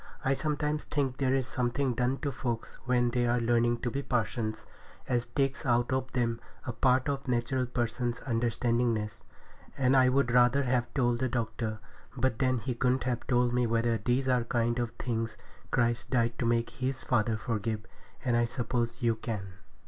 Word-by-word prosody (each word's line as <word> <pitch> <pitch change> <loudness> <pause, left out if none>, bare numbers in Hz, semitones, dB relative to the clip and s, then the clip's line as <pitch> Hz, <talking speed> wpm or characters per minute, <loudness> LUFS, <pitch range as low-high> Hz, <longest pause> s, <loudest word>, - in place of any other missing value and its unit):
I 135 - +4
sometimes 150 +1 -1
think 135 -3 -1
there 135 -1 +2
is 135 -2 +1
something 130 +1 0
done 125 +3 0
to 140 - 0
folks 120 -2 -4
when 120 -1 +2
they 120 0 +1
are 120 +1 +2
learning 120 0 +2
to 120 - -1
be 140 - -2
parsons 110 -3 -2 0.4
as 120 -2 0
takes 135 +2 -1
out 120 -1 +2
of 130 0 -1
them 115 -2 0 0.2
a 125 - -3
part 130 +2 +3
of 140 -1 -2
a - - -3
natural 125 +1 0
person's 120 0 -1
understandingness; 115 -2 0 0.6
and 130 0 +3
I 130 -1 +6
would 130 -2 +2
rather 125 +3 +5
have 125 -1 0
told 120 -3 +2
the 130 0 0
doctor, 115 -2 -2 0.4
but 130 -4 +1
then 130 -1 +2
he 120 +3 -2
couldn't 125 +1 +1
have 120 -2 -2
told 125 -1 +2
me 125 -1 +2
whether 115 0 +1
these 125 +5 0
are 125 -1 +4
the 115 - -4
kind 120 0 0
of 120 -1 0
things 115 -2 -2 0.3
Christ 120 -1 +1
died 120 -2 +1
to 120 - +1
make 115 0 +1
His 130 0 -3
Father 115 -2 +1
forgive, 110 -1 -2 0.4
and 120 -2 +2
I 120 0 +3
suppose 120 +1 -2
you 115 -2 +2
can. 105 -4 -5
120 Hz, 185 wpm, -30 LUFS, 115-130 Hz, 0.6 s, I